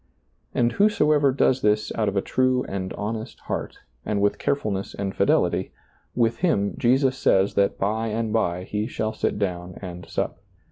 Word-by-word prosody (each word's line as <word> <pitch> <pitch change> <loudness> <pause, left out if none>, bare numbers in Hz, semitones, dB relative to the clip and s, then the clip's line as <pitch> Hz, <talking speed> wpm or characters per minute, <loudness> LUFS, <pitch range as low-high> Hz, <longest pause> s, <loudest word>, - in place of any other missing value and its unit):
And 120 -1 +3
whosoever 150 - +3
does 130 -1 +2
this 105 0 +2
out 110 -2 +1
of 100 - -3
a 100 - +1
true 130 0 +1
and 95 -1 -4
honest 110 +3 -5
heart - - -4 0.3
and 105 -1 -1
with 100 0 +1
carefulness 105 -8 -1
and 100 -1 -3
fidelity, 90 -2 +1 0.4
with 115 -1 +2
him, 100 - +1
Jesus 130 +2 +3
says 95 -6 +3
that 100 0 +2
by 110 +3 0
and 110 0 -2
by 90 -5 0
He 105 +3 -2
shall 110 -3 -2
sit - - -1
down 90 -3 -3
and 90 -2 -8
sup. - - -2
105 Hz, 170 wpm, -24 LUFS, 100-125 Hz, 0.4 s, And